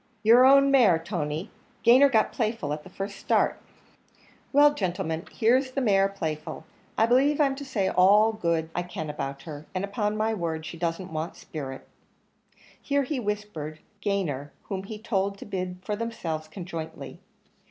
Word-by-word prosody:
"Your 235 +4 +7
own 275 +1 +6
mare, 230 -11 +6
Tony; 165 +1 -4 0.3
Gayner 260 +4 +7
got 220 -2 +3
Playful 220 - -1
at 150 - -5
the - - -12
first 195 +1 -6
start." - - +1 0.9
"Well, 290 +1 +6
gentlemen, 180 - -3
here's 255 +4 +2
the 275 - 0
mare 195 -6 +3
Playful. 160 -6 -5 0.3
I 220 - +5
believe 270 +5 +3
I'm 280 -2 +3
to 285 - -6
say 225 -8 -1
all 205 +4 +5
the 220 - -12
good 165 -3 0
I 175 - -1
can 175 -3 -5
about 140 -1 -5
her, 150 -2 -9
and 185 +2 0
upon 210 +1 -2
my 220 +1 +1
word 165 -5 -3
she 165 - -7
doesn't 170 +1 -3
want 155 +1 -3
spirit." 135 -4 -7 0.9
Here 280 0 +1
he 275 0 -2
whispered 205 -8 -4 0.2
Gayner, 170 -9 -1
whom 190 -1 -5
he 215 +1 -7
told 200 -3 -1
to - - -9
bid 185 -2 -4
for 210 - -2
themselves 170 -9 -4
conjointly. 160 -5 -7
195 Hz, 165 wpm, -26 LUFS, 160-225 Hz, 0.9 s, Your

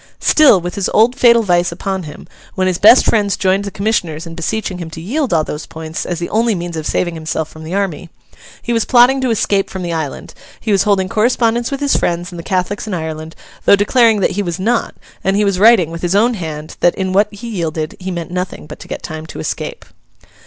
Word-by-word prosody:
Still, 290 -11 +5
with 175 +1 -5
his 200 - -1
old 230 +4 +4
fatal 235 -3 +5
vice 175 -3 +2
upon 190 +2 -3
him, - - -11 0.3
when 185 - 0
his 185 -2 0
best 225 +5 +7
friends 205 -3 +1
joined 195 +1 +1
the - - -3
commissioners 185 -6 -2
in 165 - -8
beseeching 185 +2 -3
him 170 -2 -6
to 160 - -9
yield 250 - -2
all 160 -2 +3
those 150 0 -6
points 160 0 -6
as 175 - -2
the 170 +1 -3
only 225 0 +2
means 175 -1 -5
of 155 -1 -4
saving 175 -2 -1
himself 160 -1 -3
from 155 - -12
the 165 +4 -5
army, 180 -4 -2 0.5
he 235 - -1
was 230 -2 +2
plotting 255 +2 +4
to 260 - 0
escape 200 -3 +1
from 190 -1 -6
the 170 -1 -3
island; 155 -4 -5 0.3
he 220 - -3
was 195 -2 +3
holding 195 -3 +2
correspondence 230 +2 +1
with 275 0 -4
his 285 -1 +2
friends 175 +2 -1
and 175 - -8
the - - -7
Catholics 190 +4 -2
in 205 - -2
Ireland, 160 -1 -6 0.3
though - - +7
declaring 220 +1 +3
that - - +2
he 200 +2 -2
was 175 -2 -4
not; 230 +5 0 0.3
and 195 +1 +1
he 210 +1 +2
was 195 -2 0
writing, 210 -6 +5
with 165 0 -7
his 175 +2 0
own 235 +4 +3
hand, 155 -6 -6
that 175 - +3
in 190 -1 -2
what 205 +2 +3
he 205 +3 -9
yielded 160 -6 -3
he 185 0 -5
meant 170 -2 -5
nothing 180 -2 -4
but - - -10
to - - -11
get - - -6
time 155 -1 -7
to - - -9
escape. 80 - -5
190 Hz, 240 wpm, -16 LUFS, 170-220 Hz, 0.5 s, best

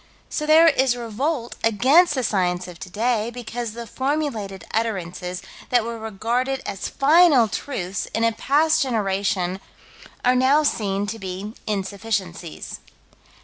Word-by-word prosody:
So 300 - -2
there 320 +2 +7
is 265 -5 +3
revolt 240 +3 -2
against 275 - +4
the 260 - -1
science 180 -4 0
of 175 -2 -11
today, 220 +6 -1
because 240 -1 -5
the 235 0 -7
formulated 260 -7 -3
utterances 180 -5 -3 0.3
that 245 -2 +3
were 230 0 -5
regarded 235 +5 -2
as 195 -2 -4
final 290 -4 +5
truths 195 -4 -4
in 225 - +1
a 230 - +4
past 300 +7 +2
generation, 195 -6 0 0.7
are 250 - +5
now 265 +4 +4
seen 200 -7 0
to 220 +2 -5
be 190 +2 -6
insufficiencies. 195 -4 -3
225 Hz, 130 wpm, -23 LUFS, 195-260 Hz, 0.7 s, there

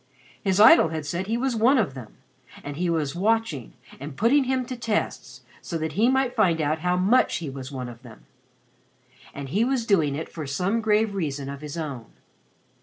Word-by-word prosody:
His 190 -1 +1
idol 215 -6 +8
had 160 -2 -4
said 170 +6 -3
that - - -11
he 230 - +1
was 260 0 -1
"one 240 +5 +4
of 195 - 0
them" 125 -5 -11 0.5
and 145 0 -6
he 175 +3 -1
was 155 -4 -1
watching 195 - -1 0.3
and 140 0 -8
putting 265 +5 +3
him 260 0 0
to 255 - -6
tests 210 - -3 0.2
so 165 - -4
that 160 0 -3
he 225 +5 +2
might 265 -1 +1
find 180 -8 +2
out 155 +1 0
how 180 +2 0
much 200 +8 +3
he 160 -6 -4
was 135 0 -8
one 130 -2 -5
of 120 -1 -11
them. 120 -4 -15 1.1
And 140 -1 -7
he 200 - +1
was 250 -2 0
doing 160 -10 +2
it 160 - -4
for 155 -4 -7
some 185 +11 -1
grave 215 -1 +2
reason 145 -7 -3
of 140 0 -7
his 150 +1 -7
own. 140 -9 -5
175 Hz, 205 wpm, -25 LUFS, 140-225 Hz, 1.1 s, idol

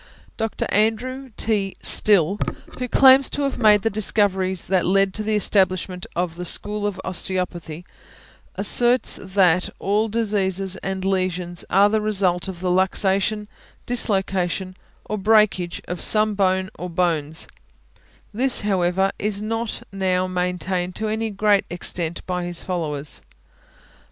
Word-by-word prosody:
Dr. 225 -1 -3
Andrew 250 +5 0
T. 205 -3 -1
Still, 200 -1 +3 0.4
who 250 - -2
claims 265 +1 +6
to 290 - -3
have 275 - -2
made 210 -3 +5
the 225 - +2
discoveries 190 -3 0
that 185 -1 +1
led 195 +1 +2
to 215 - -4
the 215 0 -1
establishment 185 -3 +1
of 175 -1 -2
the 180 - -5
school 205 +3 -2
of 195 -2 -5
Osteopathy, 180 -3 -3 0.7
asserts 240 0 +4
that 185 -2 +2
all 210 +3 0
diseases 195 -4 -1
and 190 0 -4
lesions 185 -2 -2
are 200 +2 +5
the 215 +1 0
result 195 -4 +1
of 180 -2 -7
the 180 -1 0
luxation, 195 +3 +1 0.4
dislocation, 190 -5 -1 0.3
or 215 - -4
breakage 200 -4 +2
of 175 -1 -5
some 215 0 +2
bone 190 -1 0
or 180 - -5
bones; 165 -3 0 0.9
this, 255 +4 +4
however, 190 -1 +1
is 210 -1 0
not 225 +1 -3
now 185 -2 0
maintained 180 0 -2
to 220 0 -3
any 220 +1 -2
great 205 0 +2
extent 175 -1 -4
by 180 -1 -3
his 175 -1 -6
followers. 155 -5 -1
190 Hz, 135 wpm, -22 LUFS, 180-215 Hz, 0.9 s, claims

